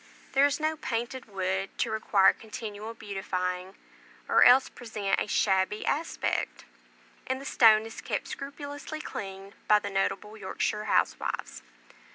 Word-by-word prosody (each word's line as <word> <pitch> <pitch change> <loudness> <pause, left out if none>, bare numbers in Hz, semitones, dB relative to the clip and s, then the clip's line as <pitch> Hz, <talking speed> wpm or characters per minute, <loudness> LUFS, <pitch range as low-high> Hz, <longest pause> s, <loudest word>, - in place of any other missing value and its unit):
There 275 +1 +5
is 285 +1 -2
no 310 0 0
painted 240 0 -3
wood 190 -1 -2
to 235 - 0
require 210 -3 +4
continual 220 0 -7
beautifying, 185 -2 -3 0.5
or - - +6
else 255 +2 +7
present 210 -4 -2
a - - -1
shabby 195 0 +1
aspect; 320 +3 -1 0.6
and 260 0 -1
the 275 - -9
stone 220 -4 +6
is 225 - -8
kept - - -3
scrupulously 285 +2 -6
clean 195 -7 -7
by 210 - +7
the 205 - -4
notable 195 +2 -1
Yorkshire 210 +1 -2
housewives. - - 0
215 Hz, 135 wpm, -28 LUFS, 195-260 Hz, 0.6 s, else